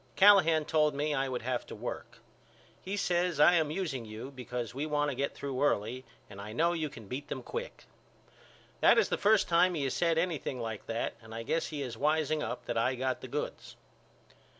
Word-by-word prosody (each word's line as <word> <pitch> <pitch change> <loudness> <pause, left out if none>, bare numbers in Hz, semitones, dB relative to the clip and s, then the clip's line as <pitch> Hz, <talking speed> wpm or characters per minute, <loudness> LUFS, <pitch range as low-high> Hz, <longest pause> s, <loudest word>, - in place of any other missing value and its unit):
Callahan 185 -6 +6
told 150 -2 +2
me 150 +1 0
I 135 -1 0
would 125 -3 -3
have 125 -1 -1
to - - -8
work. - - -6 0.6
He 195 +2 -4
says 175 -4 0
I 160 +4 +7
am 160 -4 +2
using 155 -7 -3
you 110 +4 -8
because 125 -3 -5
we 140 +4 -3
want 145 -1 +1
to - - -5
get 140 +2 -2
through 135 -2 -4
early 130 -2 0 0.2
and 100 -1 -10
I 105 +1 -7
know 170 +7 +2
you 160 -3 -2
can 115 -5 -11
beat 135 +6 -5
them - - -5
quick. 485 +1 -6 1.0
That - - +6
is - - +3
the - - 0
first 210 -1 +4
time 175 +1 +4
he 150 - -1
has 135 - -1
said 165 -2 +1
anything 165 -6 -1
like 110 -3 -5
that 115 +1 -2
and 110 0 -11
I 115 - -4
guess 165 +7 -1
he 150 -3 -4
is 120 -3 -6
wiseing 155 +1 +1
up - - -4
that 120 -1 -1
I 130 +3 +1
got 130 0 -2
the - - -7
goods. - - -5
145 Hz, 215 wpm, -31 LUFS, 125-165 Hz, 1.0 s, I